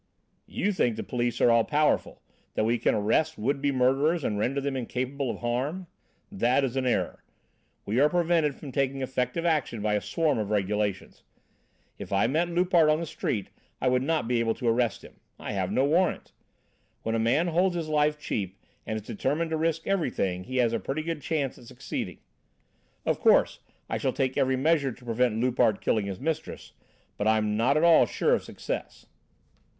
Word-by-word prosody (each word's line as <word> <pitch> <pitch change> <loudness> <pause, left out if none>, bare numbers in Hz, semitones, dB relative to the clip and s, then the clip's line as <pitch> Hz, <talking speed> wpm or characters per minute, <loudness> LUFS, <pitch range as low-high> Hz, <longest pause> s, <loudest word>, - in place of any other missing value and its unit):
"You 205 - -1
think 120 - +1
the - - -4
police 120 -1 -2
are 120 - +6
all 115 -1 +5
powerful, 150 +4 0 0.3
that - - +1
we 115 +2 +1
can - - +2
arrest 145 +10 +1
would 135 +6 -1
be 140 0 +1
murderers 135 +5 +2
and 105 -4 -1
render 135 +6 0
them 140 0 -2
incapable 130 +2 -3
of - - -5
harm? 130 +10 -2 0.5
That 140 -8 +2
is 135 -1 -1
an 130 -1 0
error. 125 - -1 0.6
We 110 +5 0
are 145 +2 +5
prevented 165 -4 +1
from 145 - -9
taking 135 0 -1
effective 130 +5 -2
action 150 -8 0
by 105 0 0
a 105 - +1
swarm 160 -7 0
of 105 -2 -2
regulations. 105 -1 -1 0.8
If - - -8
I 100 0 +3
met 160 +8 +1
Loupart 175 -2 +3
on 155 +1 +3
the 170 - -3
street 150 -9 -3 0.3
I 130 - +2
would 125 0 +2
not 155 -3 0
be 120 -1 +1
able 115 -1 +1
to 120 - -4
arrest 115 -1 +1
him. - - -15 0.2
I - - -6
have 95 -3 -2
no 130 - +2
warrant. 170 +6 +1 0.7
When 115 - -1
a 115 - +1
man 135 +10 +2
holds 175 +2 +2
his 165 -2 -3
life 150 0 +2
cheap 100 -9 -3 0.3
and 110 - -2
is 105 - -15
determined 160 +11 -2
to - - +1
risk 165 0 -1
everything, 100 - -1
he 130 0 -4
has 120 -2 +2
a 115 - 0
pretty 135 +10 -3
good 165 -2 -4
chance 145 -5 -2
of 120 - -15
succeeding. 125 0 -5 0.9
Of - - 0
course - - +4 0.3
I - - -2
shall - - 0
take 130 -1 -1
every 130 0 +2
measure 140 0 +2
to 125 +1 -14
prevent 115 -1 +1
Loupart 120 -3 +2
killing 105 -3 0
his 95 -1 -5
mistress, 160 +1 -4 0.4
but 105 - -1
I'm 110 -1 +2
not 125 +7 +2
at 155 - +2
all 170 -1 +6
sure - - +1
of - - +1
success." - - -6
130 Hz, 195 wpm, -27 LUFS, 115-155 Hz, 0.9 s, are